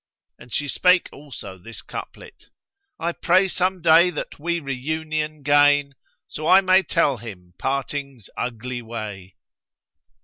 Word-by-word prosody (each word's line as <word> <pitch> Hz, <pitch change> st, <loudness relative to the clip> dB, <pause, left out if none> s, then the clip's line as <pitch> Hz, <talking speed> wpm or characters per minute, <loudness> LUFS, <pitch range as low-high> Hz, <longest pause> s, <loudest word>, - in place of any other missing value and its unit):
And 120 Hz, -, -15 dB
she 145 Hz, -, -1 dB
spake 180 Hz, +5 st, +3 dB
also 115 Hz, -10 st, -10 dB
this 115 Hz, +5 st, -9 dB
couplet, -, -, -10 dB, 0.5 s
"I 170 Hz, +1 st, -1 dB
pray 185 Hz, +3 st, +3 dB
some 185 Hz, -1 st, -1 dB
day 170 Hz, +2 st, +6 dB
that 155 Hz, -4 st, -6 dB
we 170 Hz, +3 st, -1 dB
reunion 155 Hz, +2 st, -3 dB
gain, 145 Hz, 0 st, +4 dB, 0.2 s
* 145 Hz, -, -46 dB
So 155 Hz, -, -6 dB, 0.2 s
may 185 Hz, 0 st, +2 dB
I -, -, +5 dB
tell 165 Hz, -8 st, +1 dB
him 95 Hz, -6 st, -11 dB
Parting's 140 Hz, -3 st, -3 dB
ugly 125 Hz, +1 st, -4 dB
way." 105 Hz, -5 st, -7 dB
145 Hz, 135 wpm, -23 LUFS, 120-160 Hz, 0.5 s, day